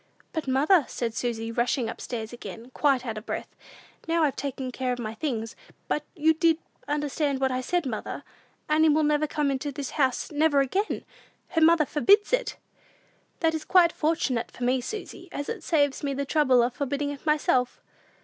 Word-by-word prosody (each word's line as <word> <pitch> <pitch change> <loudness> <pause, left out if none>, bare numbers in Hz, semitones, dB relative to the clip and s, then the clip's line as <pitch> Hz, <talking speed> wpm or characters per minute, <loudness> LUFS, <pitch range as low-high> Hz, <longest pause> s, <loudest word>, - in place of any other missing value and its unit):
"But, 315 -4 -3
mother," 290 +5 +4
said 230 -2 -3
Susy, 230 -1 -2
rushing 240 +1 0
up 225 - -6
stairs 225 -2 -5
again, 240 0 -9
quite 270 -4 +2
out 220 -2 -3
of 215 - -18
breath, - - -5 0.5
"now 330 0 +2
I've 290 -3 +1
taken 265 -2 -4
care 255 0 -2
of 245 - -1
my 220 -2 -4
things; 225 -3 -3 0.3
but 300 - -1
did 320 +1 +2
you 325 -1 +5 0.3
understand 290 -1 -1
what 265 -1 +1
I 255 0 -1
said, 350 +5 0
mother? 225 -5 -4 0.4
Annie 310 +1 +4
will 305 +1 +3
never 300 0 +2
come 295 -1 0
into 275 +2 -2
this 280 -1 -5
house, 265 -1 0
never 300 -1 +3
again! 380 +11 -1 0.4
Her 325 -4 0
mother 325 -1 +6
forbids 400 - +3
it!" - - 0 0.8
"That 325 -1 +3
is 315 -1 -3
quite 355 -3 +5
fortunate 295 -8 0
for 245 - -8
me, 250 +1 +2
Susy, 365 - -7
as 285 - -4
it 460 -5 -4
saves 290 -4 +1
me 280 -2 -2
the 280 +1 -2
trouble 265 -5 +4
of 240 +1 0
forbidding 285 +1 -2
it 285 - -9
myself!" 290 -5 +1
285 Hz, 190 wpm, -26 LUFS, 255-315 Hz, 0.8 s, mother